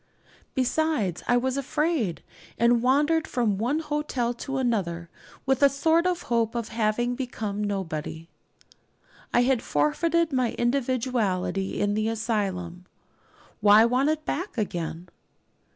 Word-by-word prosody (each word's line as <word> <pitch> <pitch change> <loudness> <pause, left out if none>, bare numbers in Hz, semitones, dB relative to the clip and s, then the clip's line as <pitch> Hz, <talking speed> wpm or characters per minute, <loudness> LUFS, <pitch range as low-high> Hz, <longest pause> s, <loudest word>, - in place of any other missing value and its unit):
Besides, 260 - 0
I 245 - +4
was 260 +2 0
afraid; 275 - -1 0.3
and 235 0 +3
wandered 295 +6 +2
from 215 -6 0
one 250 +7 0
hotel 295 -6 -2
to 265 +3 -5
another 180 -10 -1 0.3
with 265 0 +1
a 280 - +7
sort 320 +5 +2
of 355 -1 -1
hope 230 -1 0
of 235 -2 -3
having 230 +2 0
become 220 -5 -4
nobody. 165 -5 -4 1.0
I 240 - +4
had 255 -2 +2
forfeited 320 - +1
my 255 -3 0
individuality 240 -7 0
in 205 0 +1
the 215 +1 0
asylum; 195 -6 -2 0.7
why 210 +2 +7
want 255 +5 +2
it 310 0 -1
back 355 -2 -3
again? 175 -4 -3
240 Hz, 125 wpm, -26 LUFS, 205-275 Hz, 1.0 s, a